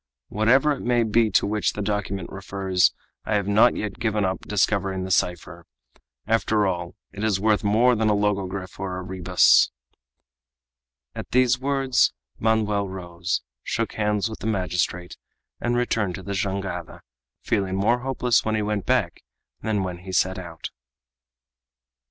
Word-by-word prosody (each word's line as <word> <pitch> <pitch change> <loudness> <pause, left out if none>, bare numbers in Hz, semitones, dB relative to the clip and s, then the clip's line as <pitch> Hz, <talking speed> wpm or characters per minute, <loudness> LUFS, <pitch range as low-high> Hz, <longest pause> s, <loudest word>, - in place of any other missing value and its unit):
Whatever 125 +8 +3
it 140 - -3
may 120 -1 +2
be 110 0 +2
to 95 - +3
which 105 -2 0
the 105 - -4
document 100 -3 -3
refers, 95 -2 +1 0.3
I 105 - -1
have 100 -2 0
not 105 +4 +5
yet 105 -2 -4
given 105 -3 0
up 95 -1 -1
discovering 95 -2 0
the 95 - -4
cipher. 85 -1 -1 0.6
After 110 -1 +2
all, 85 -2 -3 0.2
it 105 - -6
is 105 -4 +1
worth 105 +1 +2
more 115 +4 +4
than 110 -1 +1
a 105 - +3
logogryph 100 -2 -2
or 95 -1 -3
a 95 - -5
rebus!" 90 -1 +4 1.4
At - - -7
these 125 0 +3
words 135 -3 +2 0.3
Manoel 105 -2 +1
rose, 90 -1 -3 0.2
shook - - -2
hands 105 0 0
with 110 - -8
the - - -4
magistrate, 90 -3 -2 0.4
and 120 0 0
returned 110 -6 0
to 95 - -9
the 100 - -4
jangada, 95 -3 -3 0.4
feeling 95 -2 0
more 110 +5 +2
hopeless 125 -1 +1
when 110 0 0
he 110 - 0
went 105 -2 -2
back - - +1 0.4
than 105 -3 -1
when 90 -2 -5
he 95 +1 -9
set 95 +1 +1
out. 85 -3 -8
100 Hz, 155 wpm, -24 LUFS, 95-110 Hz, 1.4 s, not